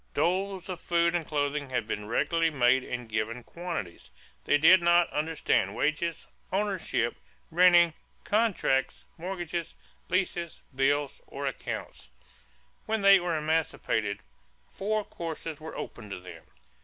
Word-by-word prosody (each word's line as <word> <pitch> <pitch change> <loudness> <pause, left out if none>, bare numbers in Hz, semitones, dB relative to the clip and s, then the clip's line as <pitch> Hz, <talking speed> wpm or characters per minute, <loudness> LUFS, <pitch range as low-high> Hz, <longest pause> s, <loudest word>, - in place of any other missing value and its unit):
Doles 190 +1 0
of 180 -2 -5
food 170 0 +2
and 175 -1 0
clothing 145 -2 -1
had 125 -4 -1
been 105 -2 -4
regularly 165 +8 +1
made 130 -3 +3
in 125 -1 -5
given 110 +2 -3
quantities. 170 - -6 0.4
They 145 - +4
did 175 +5 +7
not 170 0 +5
understand 155 +2 0
wages, 155 +2 -1 0.3
ownership, 190 - 0 0.3
renting, 175 -1 +6 0.3
contracts, 205 - +1
mortgages, 175 -1 -4 0.3
leases, 175 -2 -1
bills, 140 +1 +1
or 140 +1 -5
accounts. 135 - -5 0.8
When 220 -2 0
they 195 -1 +8
were 175 -2 -1
emancipated, 150 -9 -1 0.5
four 215 +2 -1
courses 165 -2 -6
were 160 - -7
open 110 -4 -7
to 95 - -5
them. 90 0 -12
165 Hz, 125 wpm, -28 LUFS, 135-175 Hz, 0.8 s, they